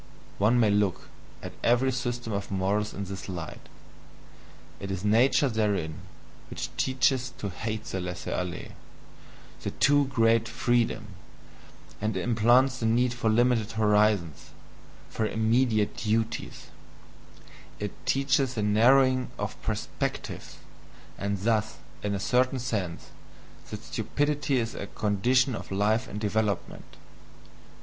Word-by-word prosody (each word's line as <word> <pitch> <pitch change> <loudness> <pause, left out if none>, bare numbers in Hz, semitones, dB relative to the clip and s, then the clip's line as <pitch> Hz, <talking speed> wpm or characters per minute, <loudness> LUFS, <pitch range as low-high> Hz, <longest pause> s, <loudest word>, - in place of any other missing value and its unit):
One 110 +5 +4
may 110 -3 +4
look 100 -3 0 0.3
at - - -6
every 125 +3 +3
system 120 -3 -3
of 100 0 -3
morals 100 +2 0
in 100 - -5
this 95 0 -7
light: 85 -4 -7 1.1
it 100 - -6
is 95 0 -3
"nature" 120 +7 +4
therein 105 -9 0 0.6
which - - -6
teaches 130 0 +1
to 105 -6 -4
hate 110 +3 -4
the 95 - -4
laisser 90 -1 -5
aller, 90 -1 -4 0.9
the - - -2
too 145 0 +3
great 115 -3 +3
freedom, 120 -3 0 0.9
and 105 -1 -1
implants 120 +5 +3
the 115 - 0
need 120 +2 +2
for 120 -2 0
limited 115 -1 +2
horizons, 105 -6 +2 0.6
for 110 - -1
immediate 110 -1 +1
duties 110 +1 -2 1.1
it 105 -1 -3 0.2
teaches 135 -1 +2
the 105 - -1
NARROWING 130 +4 +4
OF - - -5
PERSPECTIVES, - - -4 0.6
and 100 0 -1
thus, 110 -5 +1 0.2
in 100 -1 -1
a - - -2
certain 125 +6 +2
sense, 110 -9 -3 0.6
that - - -7
stupidity 145 -1 -1
is 115 -2 -1
a 100 - -6
condition 120 +6 +1
of - - -6
life 105 +3 +1
and 105 - -6
development. 105 -2 -2
110 Hz, 125 wpm, -27 LUFS, 105-125 Hz, 1.1 s, One